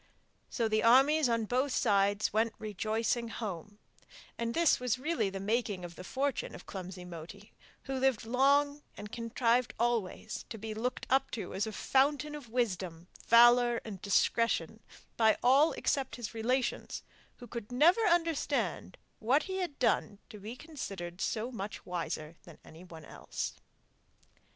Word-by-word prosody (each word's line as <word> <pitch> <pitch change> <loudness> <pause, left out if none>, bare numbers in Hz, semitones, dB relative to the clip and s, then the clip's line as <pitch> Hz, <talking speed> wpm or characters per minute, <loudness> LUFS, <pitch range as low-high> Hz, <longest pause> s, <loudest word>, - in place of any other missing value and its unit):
So 230 -3 0
the 215 0 +1
armies 270 +4 +5
on 230 -1 +1
both 255 +5 0
sides 205 -3 +2
went 220 +1 +1
rejoicing 220 +3 -1
home, 205 -3 -6 0.6
and 235 0 -3
this 335 -2 +4
was 250 -1 0
really 260 -6 0
the 195 0 -6
making 205 -2 -1
of 175 -1 -10
the 185 - -9
fortune 270 +6 -2
of - - -12
clumsy 185 -1 -7
Moti, 180 +4 -10 0.3
who 270 - -5
lived 260 -4 +1
long 280 +4 +3 0.2
and 210 0 -8
contrived 235 +1 0
always 225 -3 -1
to 225 - -6
be 220 +1 -5
looked 240 +4 -3
up 270 0 +3
to 200 -5 -5
as 200 +3 -1
a - - -4
fountain 285 +6 +1
of 290 -6 -8
wisdom, 185 -8 -2 0.2
valour, 240 0 +6
and 200 -5 -7
discretion 215 -1 +1 0.4
by 220 -1 +4
all 275 +6 +5
except 275 -3 -1
his 240 -3 -6
relations, 245 +3 -1 0.3
who 245 - -10
could 235 -2 -7
never 325 - +5
understand 335 -4 0 0.2
what 265 +7 +2
he 380 0 -4
had 355 -6 -3
done 215 -4 +1
to 210 - -10
be 215 +4 -7
considered 195 - -7
so 235 0 -2
much 205 -3 -6
wiser 170 -2 -4
than 170 -3 -14
anyone 165 -1 -12
else. - - -5
230 Hz, 150 wpm, -31 LUFS, 205-260 Hz, 0.6 s, valour